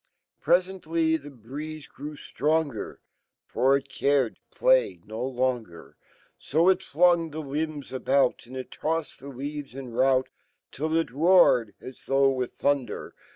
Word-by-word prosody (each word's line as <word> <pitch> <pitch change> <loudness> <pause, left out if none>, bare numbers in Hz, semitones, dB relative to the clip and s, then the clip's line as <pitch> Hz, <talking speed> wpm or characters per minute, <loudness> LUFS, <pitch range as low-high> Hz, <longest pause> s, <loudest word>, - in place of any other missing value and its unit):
Presently 170 -3 +1
fhe 145 0 -11
breeze 150 +5 -7
grew 150 +2 -9 1.3
For 135 +2 +3
it 140 - -9
cared 140 -4 +1
to - - -21
play - - +3
n - - -20
longer. 120 -5 -3 0.4
So 165 +5 +2
it 190 0 +3
flung 170 -1 +3
the 155 +1 -6
limb* 150 0 -3
about, 130 0 +2
Andittoffed 145 +5 -4
deleaves 140 0 -7
in 135 -2 -7
rout, 130 +2 +2 0.4
Till 155 +3 -2
it 165 - 0
ro 175 +7 +6
a - - +5
red, 110 -4 -12
a - - -14
Sfrvugh 135 +1 +1
with 125 -1 -3
thunder. 140 -5 -1
140 Hz, 135 wpm, -26 LUFS, 130-160 Hz, 1.3 s, ro